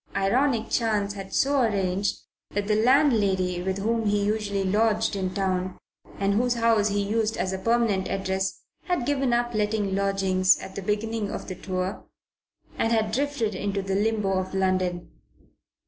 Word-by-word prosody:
Ironic 230 +5 +1
chance 210 -4 +1
had 195 -1 -8
so 280 0 +2
arranged 195 -3 0 0.3
that 205 0 0
the 210 - +2
landlady 215 -8 +3
with 190 +1 -2
whom 225 +2 0
he 205 0 +1
usually 205 -2 -1
lodged 215 +2 +1
in 190 -2 -2
town, 185 -1 -1 0.4
and 200 0 +1
whose 245 +3 +1
house 230 -3 +3
he 205 -1 0
used 220 +2 0
as 190 0 -1
a 190 - -3
permanent 225 -3 +1
address, 190 0 -2 0.2
had 355 -10 -1
given 275 -2 +1
up 240 0 +1
letting 210 -2 0
lodgings 195 -1 +2
at 190 - -9
the 200 - -5
beginning 210 +1 -2
of - - -6
the 185 - -4
tour, 185 +1 -4 0.8
and 225 - +1
had 220 -2 +1
drifted 265 -3 -1
into 195 +1 -2
the 195 0 -2
limbo 205 -2 +1
of 185 +1 -5
London. 185 -2 0
205 Hz, 165 wpm, -25 LUFS, 190-225 Hz, 0.8 s, landlady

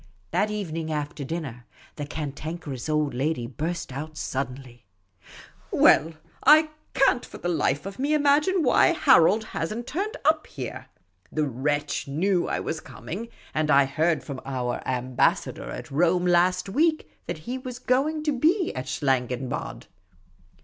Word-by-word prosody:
That 205 +3 +1
evening, 165 -7 -3
after 150 -1 -3
dinner, 135 -6 -5 0.3
the 145 - -5
Cantankerous 150 -2 -5
Old 150 -2 +1
Lady 130 -1 -1
burst 160 +6 -4
out 155 +4 -6
suddenly: 125 -5 -5 0.4
" - - -18
Well, 160 +2 +5 0.3
I 310 +2 +7 0.3
can't 255 -2 +4
for - - -10
the - - -4
life 145 -3 0
of 195 +3 -7
me 290 +3 +2
imagine 300 +5 +3
why 275 +6 +5
Harold 215 - +4
lias 165 - -2
n't 235 +2 -4
turned 395 - -3
up 310 +1 +3
here. - - -7 0.4
The 155 -1 0
wretch 145 +4 -1
knew 175 +6 +1
I - - -1
was 160 - -3
coming; 200 +8 -7 0.3
and 155 0 0
I 140 -1 +6
heard 155 +3 +1
from 140 -3 -6
our 125 -2 -3
Ambassador 125 -1 0
at - - -7
Rome 175 +4 +2
last 180 +1 +3
week 310 +9 +1 0.2
that 175 - -3
he 255 +2 -3
was 255 -1 -7
going 275 +5 +1
to 305 - +1
be 330 - +2
at 130 0 -5
Schlangenbad." 130 -1 -2
160 Hz, 150 wpm, -26 LUFS, -, 0.4 s, I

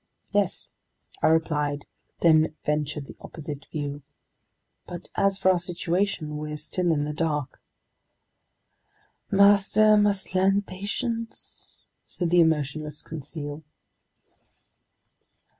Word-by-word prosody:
"Yes," - - 0 0.5
I - - +4
replied, 150 -3 +1 0.4
then 160 -2 +5
ventured 150 -1 -1
the - - -11
opposite 150 -2 -7
view. 145 -1 -4 0.9
"But 175 0 -8
as 195 -1 +2
for 190 -1 +4
our 180 - +2
situation, 175 -2 -1
we're 150 0 -4
still 175 +3 0
in 145 -2 +1
the 150 0 -3
dark." 150 -3 -2 1.7
"Master 200 +2 +5
must 200 -2 +1
learn 195 +2 +3
patience," 225 +5 -5 0.3
said 175 -2 -2
the 175 0 +6
emotionless 150 -1 0
Conseil. 150 -1 -6
160 Hz, 100 wpm, -26 LUFS, 150-190 Hz, 1.7 s, the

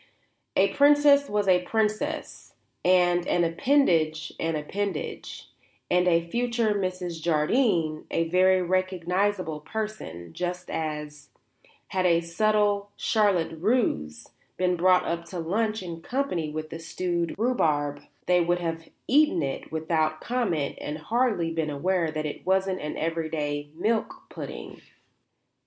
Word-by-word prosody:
A - - +4
princess 285 0 +5
was 205 -1 0
a 180 -1 +5
princess, 220 - -2 0.3
and 175 -1 +3
an 175 - +2
appendage 165 - +2
an 165 -1 -1
appendage, 185 +3 -4 0.4
and 180 0 +3
a 170 -1 +3
future 235 +1 0
Mrs. 185 -4 -3
Jardine 165 - +1
a 165 - 0
very 185 +2 +4
recognizable 185 -1 0
person; 150 - -6
just 180 0 -4
as, 150 -2 -5 0.6
had 185 -1 +1
a 170 -1 +4
subtle 205 +3 +1
charlotte 195 -7 +1
russe 170 - 0 0.3
been 180 -1 +1
brought 180 +1 +4
up 170 0 -2
to 180 +2 -7
lunch 215 +5 -1
in 165 -2 -7
company 220 - -2
with 155 +1 -6
the 165 - -6
stewed 170 0 -2
rhubarb 150 - +1 0.2
they 180 -1 +4
would 175 +1 +1
have 165 -2 -4 0.2
eaten 285 - +4
it 135 -1 -4
without 155 -1 0
comment 190 - -1
and 150 +1 -4
hardly 210 -1 0
been 160 -2 -1
aware 170 +3 0
that 155 0 -3
it 150 - -5
wasn't 190 0 +1
an 150 - -4
everyday 155 -3 -2
milk 220 +5 0 0.2
pudding. - - -8
175 Hz, 130 wpm, -26 LUFS, 160-205 Hz, 0.6 s, princess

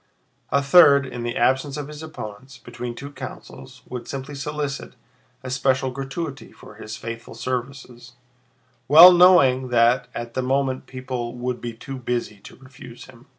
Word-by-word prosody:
A 140 +2 +1
third, 140 -2 +6
in 125 -2 -7
the 120 0 -3
absence 135 +3 +1
of 145 -2 -5
opponents, 130 -4 -9
between 120 0 -8
two 140 +4 -9
councils 130 -1 -11
would 125 -1 -7
simply 135 +1 -6
solicit 145 0 -5 0.5
a 130 - -6
special 130 0 0
gratuity 135 +2 -6
for - - -15
his 110 0 -9
faithful 115 +1 -8
services, 125 0 -6 0.7
well 165 +6 +10
knowing 175 -8 +5
that 120 +1 +2
at 120 0 -6
that 130 - -1
moment 130 0 -1
people 125 -2 -6
would 125 0 -4
be 120 -1 -5
too 135 +4 -8
busy 120 -4 -4
to 100 - -14
refuse 130 -2 -13
him. 125 -2 -18
130 Hz, 150 wpm, -22 LUFS, 120-140 Hz, 0.7 s, well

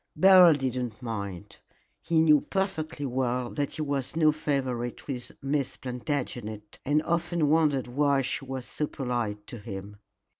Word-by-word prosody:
Beryl 180 0 +8
did 135 -3 -2
not 125 -4 -4
mind. 100 -6 -5 0.4
He 165 -1 +1
knew 150 -2 +6
perfectly 175 -7 -2
well 125 -1 -1
that 145 -2 -2
he 155 - -3
was 140 -1 -2
no 155 -2 +5
favorite 130 -5 -2
with 125 -4 -4
Miss 140 -1 -1
Plantagenet, 120 -5 -4
and 150 +2 +2
often 170 -2 0
wondered 150 -4 +3
why 140 +2 +2
she 135 - -2
was 130 -2 -5
so 150 - -3
polite 120 -7 -3
to 120 - -9
him. 100 -1 -8
135 Hz, 150 wpm, -28 LUFS, 120-155 Hz, 0.4 s, Beryl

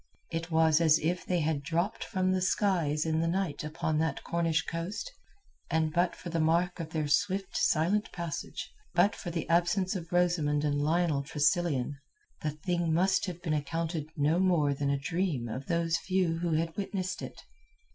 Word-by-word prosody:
It 165 +1 -3
was 160 -1 +4
as 160 -2 +6
if 175 +3 -2
they 180 -2 +1
had 155 -2 0
dropped 170 +8 -1
from 185 -3 0
the 185 0 +1
skies 175 -6 +1
in 160 0 +1
the 165 - +1
night 175 -3 -1
upon 160 0 -1
that 160 -3 -1
Cornish 165 -1 0
coast, 180 - -4 0.6
and 160 -1 +1
but 175 +1 +2
for 175 - -8
the 165 - 0
mark 170 +3 +2
of 165 -2 -4
their 155 -2 -1
swift, 190 +6 0
silent 190 +7 +2
passage, 170 -4 -5 0.2
but 190 +5 +4
for 175 - -6
the 170 -1 -3
absence 175 +4 +2
of 170 -3 -6
Rosamund 170 -5 +2
and 145 -1 +1
Lionel 160 -1 +2
Tressilian, 150 -2 0 0.4
the 155 - 0
thing 170 +2 -1
must 185 +5 +2
have 175 -1 -6
been 160 -4 0
accounted 155 +1 -2
no 150 +4 +2
more 170 -6 +3
than 140 0 -1
a 140 - +2
dream 150 -3 -1
of 130 +5 -5
those 170 -1 +1
few 180 -2 0
who 170 -1 0
had 165 +1 0
witnessed 195 -2 -3
it. - - -8
165 Hz, 180 wpm, -30 LUFS, 155-180 Hz, 0.6 s, as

